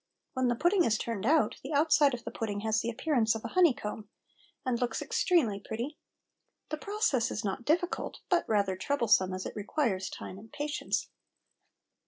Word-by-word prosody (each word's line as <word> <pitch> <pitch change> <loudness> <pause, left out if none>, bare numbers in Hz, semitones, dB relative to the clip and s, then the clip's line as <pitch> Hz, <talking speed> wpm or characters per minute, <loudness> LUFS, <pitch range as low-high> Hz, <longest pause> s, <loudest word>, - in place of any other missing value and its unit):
When 260 -1 +1
the 240 - +2
pudding 350 - +3
is 220 -6 +2
turned 230 -2 -3
out 315 +1 +3
the - - -6
outside 290 -2 +4
of 240 - -10
the - - -5
pudding 205 -3 -3
has 220 0 +1
the 230 - -2
appearance 235 -2 +1
of 225 - -6
a - - -3
honey 345 -5 +4
comb, 210 0 -6 0.6
and 250 -2 0
looks 240 -2 0
extremely 260 - +1
pretty. 235 +9 -5 0.7
The 310 - -2
process 400 - 0
is 210 - -4
not 200 +4 -3
difficult, 345 +5 0
but 355 -2 +1
rather 200 -3 +2
troublesome, 215 -4 +2
as 185 0 -4
it - - -6
requires 210 -3 -1
time 190 - -8
and 225 +2 -15
patience. 295 0 -2
235 Hz, 180 wpm, -30 LUFS, 215-300 Hz, 0.7 s, outside